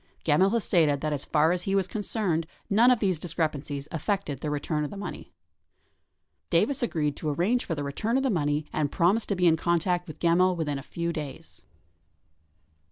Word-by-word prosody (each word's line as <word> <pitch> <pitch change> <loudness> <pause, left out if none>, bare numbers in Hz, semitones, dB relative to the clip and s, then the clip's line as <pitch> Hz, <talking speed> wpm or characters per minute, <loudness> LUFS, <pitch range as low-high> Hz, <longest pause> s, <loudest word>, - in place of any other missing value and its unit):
Gemmill 165 +5 +4
has 230 -3 +1
stated 150 -5 +2
that 155 -1 -1
as 140 - -4
far 155 +1 +3
as 180 0 0
he 195 +2 -1
was 195 -2 +1
concerned, 195 -5 -2 0.2
none 230 +5 +6
of 250 - +5
these 190 -7 0
discrepancies 155 -4 -3
affected 160 - -2
the 150 - -2
return 150 +1 -1
of 150 - -3
the 205 - -8
money. 205 - -7 1.2
Davis 280 -1 +2
agreed 150 -11 0
to 155 - -3
arrange 185 +12 +1
for 165 - -2
the 145 - -3
return 215 - -1
of 270 - +1
the 265 - +1
money 150 -4 0
and 145 -2 0
promised 195 +6 +2
to 200 - +1
be 180 -1 +1
in 165 -1 +5
contact 175 +2 0
with 155 -2 -9
Gemmill 180 +2 +3
within 150 -4 -2
a - - -7
few 170 +4 -3
days. 150 -4 -8
170 Hz, 195 wpm, -27 LUFS, 150-195 Hz, 1.2 s, none